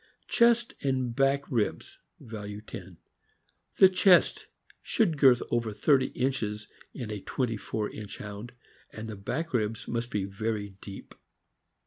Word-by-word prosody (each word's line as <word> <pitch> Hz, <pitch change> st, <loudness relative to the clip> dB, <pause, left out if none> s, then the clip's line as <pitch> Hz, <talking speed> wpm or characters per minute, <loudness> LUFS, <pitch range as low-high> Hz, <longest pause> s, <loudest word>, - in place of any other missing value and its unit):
Chest 235 Hz, 0 st, +4 dB
and 130 Hz, -3 st, 0 dB
~back 135 Hz, +1 st, +3 dB
ribs 115 Hz, -5 st, -1 dB, 0.2 s
(value 105 Hz, -2 st, -7 dB
10). 95 Hz, -4 st, -10 dB, 0.4 s
— -, -, -41 dB
The 190 Hz, -, +9 dB
chest 185 Hz, -1 st, +4 dB, 0.3 s
should 200 Hz, -9 st, +1 dB
girth 130 Hz, -4 st, +5 dB
over 115 Hz, -2 st, 0 dB
thirty 130 Hz, +5 st, +3 dB
inches 110 Hz, -5 st, -1 dB, 0.2 s
in 120 Hz, -5 st, -6 dB
a 105 Hz, -2 st, -4 dB
twenty 120 Hz, 0 st, -1 dB
four 105 Hz, 0 st, -3 dB
inch 105 Hz, -1 st, -8 dB
Hound, 105 Hz, +4 st, -8 dB, 0.4 s
and 110 Hz, +1 st, -7 dB
the 110 Hz, -, -6 dB
back 155 Hz, +12 st, -4 dB
ribs 110 Hz, -2 st, -1 dB
must 120 Hz, 0 st, -2 dB
be 100 Hz, -4 st, -1 dB
very 105 Hz, +1 st, -3 dB
deep. 100 Hz, -1 st, -10 dB
115 Hz, 140 wpm, -29 LUFS, 105-135 Hz, 0.4 s, The